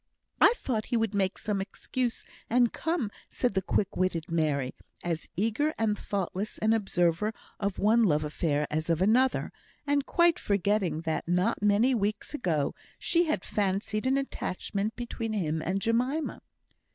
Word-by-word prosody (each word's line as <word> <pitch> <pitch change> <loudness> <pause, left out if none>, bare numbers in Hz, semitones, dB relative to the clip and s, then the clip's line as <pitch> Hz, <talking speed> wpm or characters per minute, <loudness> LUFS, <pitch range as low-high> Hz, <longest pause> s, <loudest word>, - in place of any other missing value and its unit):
"I 480 - +7
thought 225 -5 -2
he 240 - +1
would 225 -2 0
make 195 -2 0
some 205 -2 -1
excuse 240 +4 -3 0.2
and 240 0 +3
come," 320 -10 -1 0.2
said 245 -4 0
the 190 - +1
quick 195 0 0
witted 175 -3 -1
Mary, 145 -5 0 0.3
as 170 -2 -3
eager 230 - +1
and 220 -2 +1
thoughtless 200 0 -3
an 220 +1 +2
observer 195 -1 +1 0.3
of 200 -2 -1
one 225 +2 +4
love 155 -5 +2
affair 150 0 0
as 155 +2 -1
of 165 -1 +2
another, 240 +7 +3 0.3
and 285 -1 +2
quite 345 -1 +4
forgetting 200 -4 +1
that, 160 -1 -2
not 180 +7 +1
many 210 +5 +4
weeks 210 +1 -1
ago, 165 - 0 0.2
she 345 0 +2
had 310 - -1
fancied 210 +3 -1
an 265 +1 +3
attachment 210 -5 -3
between 235 -2 -4
him 160 -6 -1
and 185 +4 -1
Jemima. 250 +8 0
210 Hz, 155 wpm, -29 LUFS, 180-235 Hz, 0.3 s, I